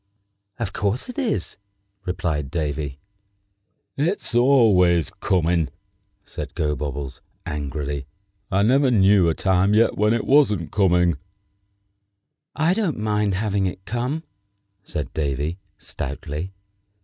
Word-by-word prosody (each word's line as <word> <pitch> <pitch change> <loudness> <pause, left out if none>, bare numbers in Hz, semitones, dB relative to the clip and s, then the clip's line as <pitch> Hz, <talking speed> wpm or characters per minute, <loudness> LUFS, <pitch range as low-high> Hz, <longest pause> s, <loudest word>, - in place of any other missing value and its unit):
"Of 110 -4 -3
course 105 - -1
it 250 - -5
is," 225 - -2 0.5
replied 85 -6 -2
Davy. 75 -3 -3 1.0
"It's 165 0 0
always 105 - +4
coming!" 85 -4 +1 0.6
said - - -7
Gobobbles, 75 -3 -3 0.2
angrily; 70 -1 -4 0.4
"I 100 0 +2
never 135 +5 +4
knew 100 -5 +5
a 80 - 0
time 95 +2 +2
yet 115 +1 +4
when 105 +2 +3
it 115 - -2
wasn't 105 - +3
coming!" 90 -5 +3 1.4
"I 160 +3 +2
don't 195 -7 -1
mind 105 -2 0
having 100 -1 0
it 95 +1 -6
come," 125 +9 -2 0.6
said 75 -6 -5
Davy, 75 +4 -2 0.2
stoutly. 75 +6 -5
95 Hz, 110 wpm, -23 LUFS, 80-115 Hz, 1.4 s, knew